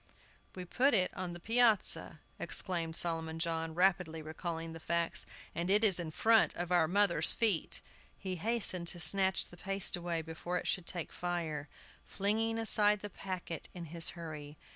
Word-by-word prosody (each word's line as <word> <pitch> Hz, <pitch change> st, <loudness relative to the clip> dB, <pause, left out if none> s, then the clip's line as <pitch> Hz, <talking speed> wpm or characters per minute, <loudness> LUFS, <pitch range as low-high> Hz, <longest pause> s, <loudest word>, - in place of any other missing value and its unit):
"We 180 Hz, -1 st, -6 dB
put 255 Hz, +8 st, +2 dB
it 185 Hz, -3 st, +3 dB
on 180 Hz, -2 st, -4 dB
the 175 Hz, -, -8 dB
piazza," 225 Hz, 0 st, +2 dB, 0.2 s
exclaimed 170 Hz, -4 st, -2 dB
Solomon 165 Hz, -2 st, 0 dB
John, 165 Hz, -1 st, -2 dB
rapidly 175 Hz, -3 st, +1 dB
recalling 165 Hz, +1 st, -5 dB
the 165 Hz, -, -9 dB
facts, 170 Hz, +1 st, -1 dB, 0.3 s
"and 175 Hz, +2 st, -3 dB
it 205 Hz, +3 st, +4 dB
is 195 Hz, -5 st, +5 dB
in 170 Hz, -2 st, -4 dB
front 225 Hz, +8 st, +3 dB
of 175 Hz, 0 st, -4 dB
our 175 Hz, -3 st, +3 dB
mother's 200 Hz, +4 st, +4 dB
feet!" 210 Hz, -8 st, +2 dB, 0.4 s
He 185 Hz, -2 st, -5 dB
hastened 200 Hz, -3 st, +1 dB
to 175 Hz, -, -5 dB
snatch 190 Hz, +3 st, +3 dB
the 175 Hz, -, -15 dB
paste 195 Hz, +2 st, 0 dB
away 170 Hz, -2 st, -3 dB
before 165 Hz, +2 st, -4 dB
it -, -, -4 dB
should 180 Hz, -3 st, -1 dB
take 175 Hz, -3 st, -3 dB
fire, 165 Hz, -4 st, -4 dB, 0.4 s
flinging 220 Hz, +3 st, 0 dB
aside 210 Hz, -2 st, +3 dB
the 205 Hz, -, -6 dB
packet 180 Hz, -5 st, -6 dB
in 175 Hz, -1 st, -7 dB
his 170 Hz, -1 st, +1 dB
hurry. 155 Hz, -3 st, -8 dB
175 Hz, 165 wpm, -33 LUFS, 165-195 Hz, 0.4 s, is